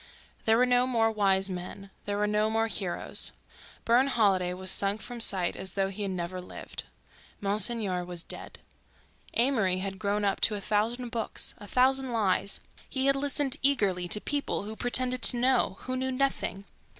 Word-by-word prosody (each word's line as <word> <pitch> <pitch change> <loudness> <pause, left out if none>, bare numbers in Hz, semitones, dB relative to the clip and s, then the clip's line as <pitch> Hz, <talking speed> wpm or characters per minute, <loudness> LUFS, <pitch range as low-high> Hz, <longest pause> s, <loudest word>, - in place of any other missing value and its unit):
There 225 0 +4
were 250 - +4
no 250 0 +3
more 225 -3 +2
wise 195 -3 +2
men; 190 +1 -7
there 205 0 -2
were 210 - +1
no 210 +1 +1
more 225 0 +1
heroes; 195 -5 -1 0.5
Burne 245 +4 +4
Holiday 195 -8 +2
was 185 +1 -3
sunk 200 +1 0
from 240 +3 -8
sight 185 -5 +2
as 190 -1 -4
though 195 -1 0
he 195 +2 -7
had 200 - -2
never 180 0 -4
lived; 180 - -8 0.5
Monsignor 200 -2 +2
was 175 -1 -6
dead. - - -4 0.8
Amory 225 -7 +2
had 190 0 -5
grown 205 0 -1
up 200 - 0
to 215 - +4
a - - -4
thousand 220 +5 -1
books, 230 -2 -1
a 205 - -11
thousand 260 +2 +2
lies; 200 -3 0 0.3
he 265 -1 -1
had 275 0 +4
listened 280 -1 +1
eagerly 200 -10 +2
to 210 - +3
people 285 -3 -2
who 215 +2 -6
pretended 250 +1 0
to 245 - +7
know, 250 -5 +2
who 255 - -4
knew 260 0 -1
nothing. 255 -7 -1
210 Hz, 175 wpm, -28 LUFS, 195-250 Hz, 0.8 s, to